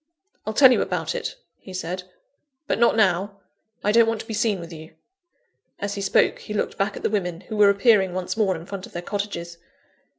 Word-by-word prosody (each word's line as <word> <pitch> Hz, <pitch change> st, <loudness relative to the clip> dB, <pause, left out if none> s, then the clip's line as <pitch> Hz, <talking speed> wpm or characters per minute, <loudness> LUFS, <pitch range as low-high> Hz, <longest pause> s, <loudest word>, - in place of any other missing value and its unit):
"I'll 215 Hz, -, -1 dB
tell 265 Hz, -2 st, +8 dB
you -, -, +3 dB
about -, -, -2 dB
it," -, -, -4 dB, 0.2 s
he 190 Hz, -, -10 dB
said; 180 Hz, +1 st, -4 dB, 0.6 s
"but -, -, -1 dB
not 235 Hz, -, +4 dB
now; 200 Hz, -1 st, +1 dB, 0.4 s
I 210 Hz, -, +2 dB
don't 230 Hz, +1 st, +5 dB
want 225 Hz, -1 st, 0 dB
to -, -, -12 dB
be 225 Hz, -, -5 dB
seen 215 Hz, -2 st, +1 dB
with 170 Hz, 0 st, -9 dB
you." 160 Hz, 0 st, -11 dB, 0.8 s
(As 200 Hz, 0 st, -3 dB
he 200 Hz, -, -4 dB
spoke 195 Hz, -, +2 dB
he 210 Hz, -, -7 dB
looked -, -, -1 dB
back 195 Hz, 0 st, -1 dB
at -, -, -9 dB
the -, -, +2 dB
women, 180 Hz, -5 st, -2 dB
who 215 Hz, -, -7 dB
were 205 Hz, -1 st, +6 dB
appearing 200 Hz, -2 st, +4 dB
once 185 Hz, -1 st, -3 dB
more 205 Hz, -4 st, +1 dB
in 165 Hz, 0 st, -8 dB
front 195 Hz, 0 st, -7 dB
of -, -, -20 dB
their 175 Hz, -, -5 dB
cottages.) 175 Hz, -4 st, -4 dB
200 Hz, 220 wpm, -24 LUFS, 180-215 Hz, 0.8 s, tell